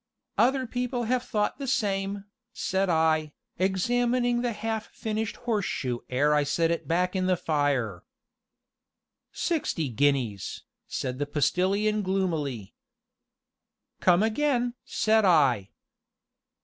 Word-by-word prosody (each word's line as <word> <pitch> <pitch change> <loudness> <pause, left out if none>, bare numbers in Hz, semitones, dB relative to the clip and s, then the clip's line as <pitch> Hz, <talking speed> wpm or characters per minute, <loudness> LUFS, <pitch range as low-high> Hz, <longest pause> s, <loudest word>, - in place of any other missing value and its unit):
"Other 260 +1 +3
people 245 0 -2
have 245 +2 +1
thought 210 -1 -1
the 275 - -4
same," 200 -4 -1 0.3
said 190 0 0
I, 160 -2 +2 0.3
examining 240 +6 +1
the 245 -1 0
half 220 0 -3
finished 220 0 -3
horseshoe 185 - -2
ere 145 +4 +2
I 150 -1 +3
set 165 +3 +1
it 170 - -2
back 180 +3 +1
in 185 -1 +1
the 185 -1 +2
fire. 140 - 0 1.3
"Sixty 280 - -1
guineas!" 120 -5 0 0.2
said 130 0 -3
the 145 - -1
Postilion 195 +8 +1
gloomily. 160 - -2 1.3
"Come 180 +2 +4
again!" 245 +1 +1
said 220 0 +2
I. 135 - +4
190 Hz, 110 wpm, -27 LUFS, 145-225 Hz, 1.3 s, Come